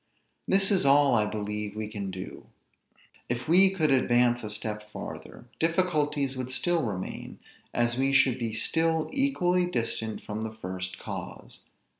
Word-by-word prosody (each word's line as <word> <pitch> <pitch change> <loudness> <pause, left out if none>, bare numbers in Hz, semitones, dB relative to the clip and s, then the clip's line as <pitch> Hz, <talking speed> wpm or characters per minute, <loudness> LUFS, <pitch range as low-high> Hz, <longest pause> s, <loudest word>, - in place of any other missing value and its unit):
This 195 +1 +4
is 195 - +3
all, 140 0 +5
I 105 -2 +3
believe, 105 0 -4
we 110 0 -3
can 105 -2 -5
do. 95 0 -8 0.8
If 120 +1 -3
we 185 +4 +6
could 160 -6 +1
advance 120 -2 +3
a 105 - -4
step 105 0 -5
farther, - - -8
difficulties 150 -5 +1
would 130 0 -4
still 175 +5 +1
remain, 100 -8 -5 0.3
as 120 +1 0
we 135 +1 +2
should 135 -2 +4
be 115 -2 -2
still 160 +6 +1
equally 180 -11 +2
distant 115 -6 -3
from 105 0 -5
the 110 0 -5
first 95 -2 -5
cause. - - -8
125 Hz, 150 wpm, -28 LUFS, 105-160 Hz, 0.8 s, we